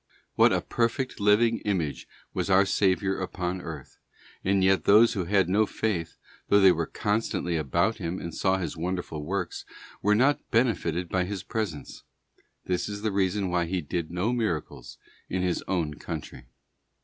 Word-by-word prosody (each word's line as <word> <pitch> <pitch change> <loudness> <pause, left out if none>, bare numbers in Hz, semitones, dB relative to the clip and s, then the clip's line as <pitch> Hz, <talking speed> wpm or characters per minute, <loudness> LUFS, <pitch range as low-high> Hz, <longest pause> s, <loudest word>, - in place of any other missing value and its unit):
What - - +5
a - - +1
perfect 120 +3 -1
living 110 +3 +3
image 85 -8 -2 0.3
was - - -2
our 95 +1 +5
Saviour 95 -1 +1
upon 90 -1 -3
éarth; 80 -6 -9 0.5
and 95 0 +2
yet 95 0 +3
those 110 +3 +6
who 95 -6 -2
had 95 0 +2
no 105 +4 +2
faith, 95 -8 -2 0.3
though 100 - +5
they 95 -2 +7
were 85 -2 -1
constantly 105 -5 -1
about 80 - +1
Him 90 -2 -4
and 85 - -6
saw 95 +2 +1
His 85 -5 -4
wonderful 85 -2 -4
works, 90 +2 -3 0.4
were 105 +2 +3
not 140 +6 +3
benefited 100 -8 +1
by 90 +1 0
His 100 0 -5
presence. 100 - -4 0.6
This 90 +2 -1
is 105 0 -6
the 110 - 0
reason 95 -1 0
why 90 -1 +1
He 90 +2 -1
did 80 +2 -3
no 90 +8 -1
miracles 105 -11 -3 0.3
in 95 0 -1
His 90 -1 -1
own 85 -5 -1
country. 65 -3 -7
95 Hz, 165 wpm, -27 LUFS, 85-105 Hz, 0.6 s, they